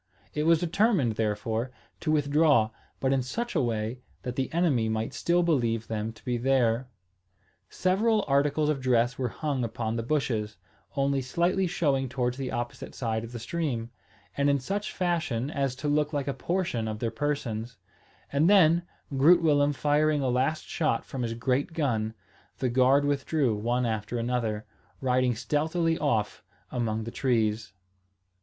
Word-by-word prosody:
It 150 +1 0
was 165 0 +6
determined, 180 - +2
therefore, 110 +2 -1 0.3
to 155 - -1
withdraw, 145 -6 +3 0.3
but 135 0 +1
in 135 - +2
such 235 - -3
a 160 - +2
way 115 0 -2 0.2
that 125 -1 -4
the 130 0 -2
enemy 150 -10 +2
might 110 0 -2
still 175 +1 +2
believe 120 -9 +1
them 110 0 -3
to - - -20
be 125 -1 0
there. 125 -1 +2 0.8
Several 210 +4 +1
articles 145 +2 +2
of 145 -3 0
dress 125 -1 +2
were 130 - 0
hung 140 -1 -2
upon 115 -1 -2
the - - -1
bushes, 115 -5 -1 0.4
only 140 -1 +1
slightly 175 +8 +1
showing 140 -7 0
towards 125 -1 -1
the 135 -2 -3
opposite 120 0 -5
side 110 -2 -2
of 115 - -8
the 120 - -6
stream, 120 -2 -3 0.4
and 140 0 +2
in 140 - +3
such 200 +10 -3
fashion 160 - -1
as 135 -4 -1
to 150 +3 -4
look 150 +1 +1
like 145 -1 -1
a 140 - 0
portion 170 -12 -1
of 110 0 -3
their 115 +1 -2
persons; 115 -4 -3 0.6
and 150 +5 +4
then, 170 -4 +6 0.3
Groot 165 +6 +6
Willem 145 -2 +4
firing 150 +1 +2
a 130 - +1
last 130 +5 0
shot 155 -8 -1
from 130 - -5
his 115 -1 -2
great 130 +6 0
gun, 115 -8 -1 0.4
the 130 - 0
guard 130 +3 +4
withdrew 140 -3 +1
one 120 +4 0
after 110 +1 -2
another, 115 -3 -1 0.3
riding 125 -2 +2
stealthily 160 +7 0
off 110 -8 0 0.3
among 110 -3 -1
the 115 - -6
trees. 110 -6 0
130 Hz, 165 wpm, -28 LUFS, 115-150 Hz, 0.8 s, was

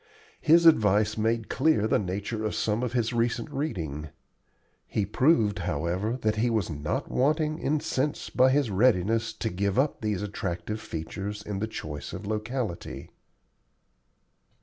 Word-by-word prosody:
His 170 +1 +5
advice 105 -8 +5
made 110 +1 0
clear 135 -7 +2
the - - +2
nature 100 +3 -3
of 110 - -1
some 110 +1 0
of 125 -2 -2
his 120 -1 0
recent 120 +6 0
reading. 80 - -3 0.8
He 105 - -1
proved, 110 - +3
however, 90 - -1
that 110 0 +1
he 120 +3 +2
was 110 -7 0
not 75 0 -3
wanting 155 +3 +1
in 150 +2 +1
sense 140 +3 -1
by 130 +1 +5
his 135 -4 +2
readiness 115 +1 +2
to 110 0 -3
give 100 +3 -1
up 140 +3 +1
these 105 -2 -1
attractive 100 0 -4
features 100 +2 -5
in 105 -2 -4
the 110 - -1
choice 75 -9 -6
of 95 +3 -6
locality. 110 -2 -4
110 Hz, 150 wpm, -27 LUFS, 95-125 Hz, 0.8 s, His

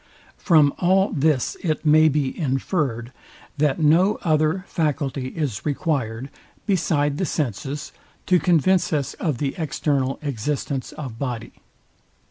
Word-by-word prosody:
From 155 -6 +4
all 190 +2 +3
this 150 -4 +1
it 160 -2 -2
may 155 +1 +6
be 140 -2 0
infered, 135 -4 -1 0.5
that 150 -2 +2
no 170 +7 +4
other 155 +2 +1
faculty 140 -5 -1
is 130 -7 -3
required, 135 -5 -2 0.3
beside 150 -7 +1
the 185 - +1
senses, 145 +2 -3 0.3
to 180 -1 +4
convince 180 +2 +2
us 145 -4 -1
of 155 -8 -1
the 135 +1 -2
external 140 -3 -1
existence 140 0 -3
of 125 -7 -7
body. 120 -5 -4
150 Hz, 120 wpm, -23 LUFS, 135-160 Hz, 0.5 s, may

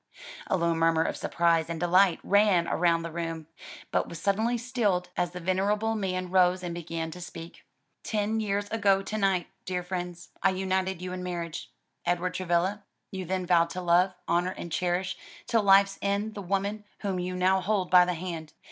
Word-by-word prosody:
A - - +1
low 170 -1 +1
murmur 165 0 +3
of - - -2
surprise 165 -1 +1
and 165 -1 -3
delight 175 +1 +4
ran 200 -4 +4
round 170 -1 +1
the 170 - -5
room, 165 -1 -4 0.5
but - - 0
was 170 - -7
suddenly 220 +6 +1
stilled, 220 -7 0
as 175 - 0
the 180 +1 -8
venerable 200 +5 0
man 185 -4 -2
rose 185 0 +3
and 175 -1 -3
began 165 -1 -4
to 180 - -9
speak. 170 -1 -9 0.4
"Ten 215 +1 -1
years 205 -1 -1
ago 200 -3 +3
to 215 +2 -4
night, 195 -3 +2 0.2
dear 180 -1 -3
friends, 180 -1 -5
I 195 - +4
united 190 -1 -1
you 185 0 -4
in 185 - -5
marriage. 170 -2 -5 0.3
Edward 175 +1 0
Travilla, 185 +3 0 0.3
you 190 -2 -5
then 185 +1 -2
vowed 170 -1 +3
to 185 +2 -5
love, 180 +2 +3
honor 175 +2 +1
and 170 - -7
cherish 180 +2 -1 0.3
till 230 -2 +2
life's 195 0 +5
end 200 +2 -1
the 205 - -6
woman 200 +3 -2 0.2
whom 195 -3 -2
you 180 +1 -3
now 185 +1 +3
hold 190 -1 0
by 180 -1 +8
the 180 0 -1
hand. 165 -2 -6
185 Hz, 185 wpm, -28 LUFS, 170-195 Hz, 0.5 s, by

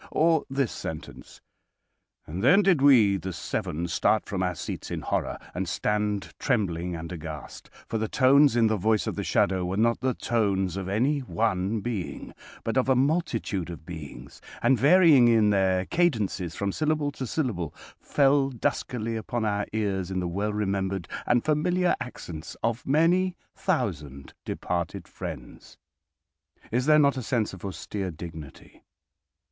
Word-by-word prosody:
Or 160 -1 +2
this 135 -3 0
sentence: 80 -1 -8 0.8
"And 90 +6 -5
then 185 +11 +6
did 180 -8 +3
we, 115 -9 +6
the 95 +1 -5
seven, 85 0 -3
start 90 +5 +1
from 95 -2 -3
our 90 -1 0
seats - - -6
in - - -4
horror, - - -2 0.2
and - - -3
stand 105 -1 -1
trembling 90 - -1
and 85 +1 -7
aghast, 80 -3 -8 0.2
for 115 - -2
the 110 - -1
tones 140 +1 +5
in 115 -1 +4
the 110 -1 +2
voice 110 +2 +1
of - - -2
the - - -3
shadow 95 -1 +1
were 90 +2 -2
not 115 +2 +2
the 130 0 0
tones 95 -6 0
of 95 -1 -4
any 130 +9 +1
one 110 -4 -1
being, 105 -5 -5 0.3
but 115 - -1
of 130 +1 +2
a 130 - +5
multitude 125 - 0
of 85 -2 -9
beings, 70 -6 -9 0.2
and, 130 - +4
varying 150 - +6
in 110 -3 +4
their 95 -2 +2
cadences 105 - 0
from 100 -1 -1
syllable 155 +2 0
to 135 -2 -5
syllable, 105 - -2 0.3
fell 140 -1 +3
duskily 115 -2 -2
upon 110 +1 -2
our 105 -1 -1
ears 100 -4 -1
in 95 -1 -2
the 90 - -2
well 100 +5 -2
remembered 95 -3 -2 0.2
and 120 -1 +2
familiar 175 +4 +2
accents 85 -10 -7
of 115 +1 -1
many 175 +6 +3 0.2
thousand 70 -2 -2
departed 85 -1 -3
friends." - - -9 0.9
Is 125 +4 0
there 155 0 +6
not 140 -2 +4
a - - -2
sense 115 -3 -1
of 95 - -11
austere 95 0 -4
dignity? 80 -3 -10
110 Hz, 155 wpm, -26 LUFS, 95-135 Hz, 0.9 s, then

